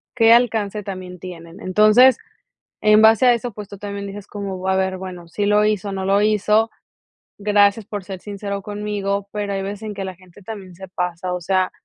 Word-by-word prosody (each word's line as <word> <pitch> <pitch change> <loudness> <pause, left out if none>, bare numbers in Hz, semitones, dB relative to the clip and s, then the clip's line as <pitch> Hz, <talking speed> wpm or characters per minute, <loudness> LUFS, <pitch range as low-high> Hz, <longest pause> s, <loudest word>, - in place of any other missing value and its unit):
qué 230 -2 +6
alcance 220 -4 +1
también 185 -2 -7
tienen, 170 -2 -10
entonces, 215 +7 +5 0.6
en 215 0 +6
base 220 +3 +6
a 245 - +7
eso, 235 0 -3
pues, 205 -1 -8
tú 200 - -9
también 200 0 -6
dices 200 0 -9
como, 195 -2 -5
a 190 - +2
ver, 190 0 0
bueno, 180 -2 -8
sí 205 +5 -2
lo 210 +1 +4
hizo, 210 -2 0
no 190 -1 -3
lo 200 +1 +3
hizo, 215 +1 +2 0.7
gracias 205 0 +3
por 205 -2 -6
ser 190 0 -7
sincero 200 0 -5
conmigo, 205 -1 -3
pero 205 -1 -3
hay 195 - -2
veces 200 +2 -6
en 215 -1 -5
que 195 - -5
la 190 -1 -6
gente 185 +2 -18
también 195 -4 -9
se 190 +2 -10
pasa, 180 0 -3
o 180 - -4
sea, 185 +1 +1
200 Hz, 205 wpm, -21 LUFS, 190-210 Hz, 0.7 s, a